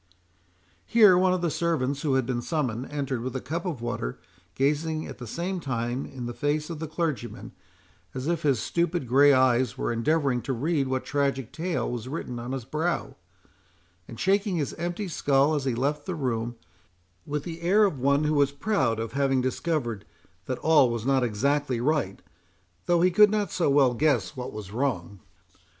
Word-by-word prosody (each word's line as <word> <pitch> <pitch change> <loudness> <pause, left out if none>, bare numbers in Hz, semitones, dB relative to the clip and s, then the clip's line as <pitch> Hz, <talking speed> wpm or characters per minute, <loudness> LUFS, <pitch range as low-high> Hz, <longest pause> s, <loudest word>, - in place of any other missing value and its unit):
Here 210 -5 +7
one 185 +1 +3
of 185 -1 0
the 170 - +1
servants 145 -4 -1
who 145 -4 +1
had 130 -2 +2
been 120 -1 -2
summoned, 130 -4 -2
entered 140 -4 -2
with 130 +1 -4
a - - -1
cup 165 +9 -4
of 140 -10 -4
water, 120 - -3 0.4
gazing 155 +3 0
at - - -9
the 120 - -7
same 180 - -3
time 125 -3 -3
in 125 -2 -7
the 120 - -4
face 150 +6 -1
of 160 - -6
the 160 - -4
clergyman, 155 -6 -3 0.6
as 130 0 -4
if 170 0 0
his 140 -6 +2
stupid 170 -4 -1
grey 140 +4 +6
eyes 130 -1 +3
were - - -1
endeavouring 135 +1 +1
to 135 - -3
read 140 +2 0
what 130 0 -2
tragic 140 -4 -1
tale 170 +1 -2
was 120 -1 -4
written 130 -4 -5
on 120 +2 -6
his 130 -3 -4
brow; 160 +6 -2 0.9
and 115 - -10
shaking 200 0 +1
his 150 -5 -2
empty 175 +4 -3
skull 140 -2 +2
as 145 -3 -1
he 130 -3 0
left 145 +6 -1
the 185 - -2
room, 120 -5 -2 0.7
with 145 0 -2
the 170 -1 -7
air 195 +5 +4
of 155 -9 -1
one 140 +3 +2
who 150 0 +1
was 140 -2 +3
proud 140 - 0
of 115 -1 -4
having 135 -1 +2
discovered 130 -4 -2 0.4
that 130 - -2
all 150 -5 +4
was 115 -1 -3
not 135 -1 +2
exactly 130 +3 0
right, 125 -7 -1 0.6
though 175 -1 +3
he 180 +1 +4
could 210 +4 +7
not 205 -3 -1
so 170 - +1
well 140 -3 +4
guess 125 -6 +1
what 125 -1 -5
was 105 -3 -8
wrong. 105 -6 -2
140 Hz, 190 wpm, -26 LUFS, 125-160 Hz, 0.9 s, Here